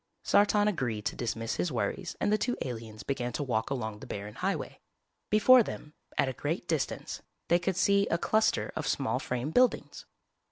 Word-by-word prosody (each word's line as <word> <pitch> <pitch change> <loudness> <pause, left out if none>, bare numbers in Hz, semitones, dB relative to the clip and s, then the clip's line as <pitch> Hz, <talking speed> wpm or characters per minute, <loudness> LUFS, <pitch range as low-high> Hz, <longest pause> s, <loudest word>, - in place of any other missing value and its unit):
Sartan 205 0 +4
agreed 120 - -1
to - - -1
dismiss 115 -1 -3
his 175 - 0
worries 120 - -2
and 205 - +1
the - - +4
two 245 - -1
aliens 110 -4 -7
began 125 -1 -2
to 145 - -2
walk 115 -4 -1
along 110 -6 -3
the - - -10
barren 105 +1 -6
highway. - - -3 0.5
Before 245 +4 +7
them, 150 -8 -6 0.2
at - - +3
a 130 - -2
great 160 +7 -3
distance, 160 -4 -2 0.3
they 175 - +5
could 185 +1 -1
see 200 +2 +3
a 170 - +1
cluster 220 +5 +1
of 155 - -3
small 130 -3 0
frame 125 +3 -3
buildings. 250 +6 +1
145 Hz, 185 wpm, -30 LUFS, -, 0.5 s, Before